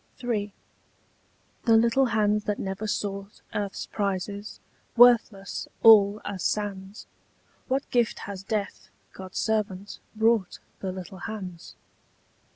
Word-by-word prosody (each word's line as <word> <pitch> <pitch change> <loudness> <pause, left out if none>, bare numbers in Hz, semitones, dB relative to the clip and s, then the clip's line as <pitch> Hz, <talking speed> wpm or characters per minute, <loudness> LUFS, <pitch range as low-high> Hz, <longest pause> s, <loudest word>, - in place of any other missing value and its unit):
III. 210 -4 -1 1.1
The 225 -2 +6
little 235 +4 +3
hands 210 -2 +1
that 210 -1 -1
never 195 +2 -4
sought 200 -1 -4
Earth's 200 -1 -3
prizes, 200 +1 -3 0.4
worthless 230 -5 +4 0.2
all 210 -2 +7
as 200 -3 -4
sands, 200 0 -3 0.6
What 270 +2 -1
gift 240 -3 +2
has 195 -2 -6
death, 205 0 -4 0.2
God's 190 -1 -9
servant, 205 -3 -2 0.2
brought 220 -4 +2 0.2
The 190 - -3
little 185 +1 -8
hands? 190 -6 -7
205 Hz, 110 wpm, -26 LUFS, 195-220 Hz, 1.1 s, all